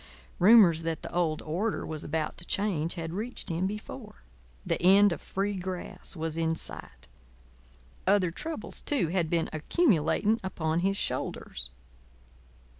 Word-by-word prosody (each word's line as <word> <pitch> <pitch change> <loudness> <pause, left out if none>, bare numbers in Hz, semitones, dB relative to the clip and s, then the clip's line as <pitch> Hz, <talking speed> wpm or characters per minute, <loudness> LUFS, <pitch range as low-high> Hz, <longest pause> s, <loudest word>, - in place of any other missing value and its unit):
Rumours 185 -4 +7
that 165 -1 -3
the - - -7
old 165 -3 0
order 190 +8 -2
was 155 -1 -3
about 155 0 -2
to 170 - -7
change 180 -6 0
had 165 -1 -5
reached 220 +4 -3
him 175 +3 0
before. 195 - -8 0.4
The - - -1
end 195 +3 +6
of - - -4
Free 200 +2 -2
Grass 185 0 -5
was 160 -1 -3
in 165 0 +1
sight. - - -6 1.0
Other 190 -3 +3
troubles, 310 - -6
too, 260 - 0
had 170 -2 0
been 170 -1 +1
accumulating 205 - +2
upon 160 -3 -1
his 195 +2 +1
shoulders. - - -3
175 Hz, 140 wpm, -29 LUFS, 160-200 Hz, 1.0 s, Rumours